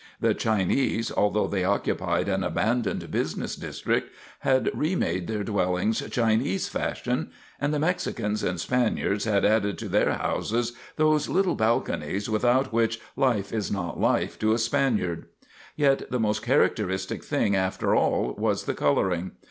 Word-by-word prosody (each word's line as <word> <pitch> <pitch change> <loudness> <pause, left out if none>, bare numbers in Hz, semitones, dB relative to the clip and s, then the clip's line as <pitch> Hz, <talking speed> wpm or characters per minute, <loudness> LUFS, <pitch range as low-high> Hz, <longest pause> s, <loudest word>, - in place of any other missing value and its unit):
The - - +2
Chinese, 110 +2 0
although 105 +1 +2
they 95 -2 -1
occupied 100 +1 0
an 95 -1 0
abandoned 110 +5 -1
business - - -2
district, - - -2 0.3
had 130 -1 +2
remade 95 - -1
their 110 -2 -2
dwellings 100 +1 0
Chinese 110 -4 +1
fashion, - - -2 0.3
and 145 - 0
the 150 - 0
Mexicans 120 - -1
and 90 -1 -1
Spaniards 110 -2 0
had 105 -3 +2
added 105 -2 +2
to - - -5
their - - +2
houses 120 +1 -1 0.2
those 155 -1 +2
little 190 0 +2
balconies 110 -3 0
without 120 +4 +2
which 115 0 +1 0.2
life 120 -7 +1
is 110 -3 -2
not 90 -4 -3
life - - +1
to 110 0 +2
a - - +2
Spaniard. 110 -7 0 0.5
Yet 140 -2 +2
the 125 - -1
most 105 -1 0
characteristic 105 -7 0
thing 100 - +1
after 95 0 0
all - - +1
was - - 0
the - - -2
coloring. 85 +5 0
110 Hz, 145 wpm, -26 LUFS, 100-120 Hz, 0.5 s, The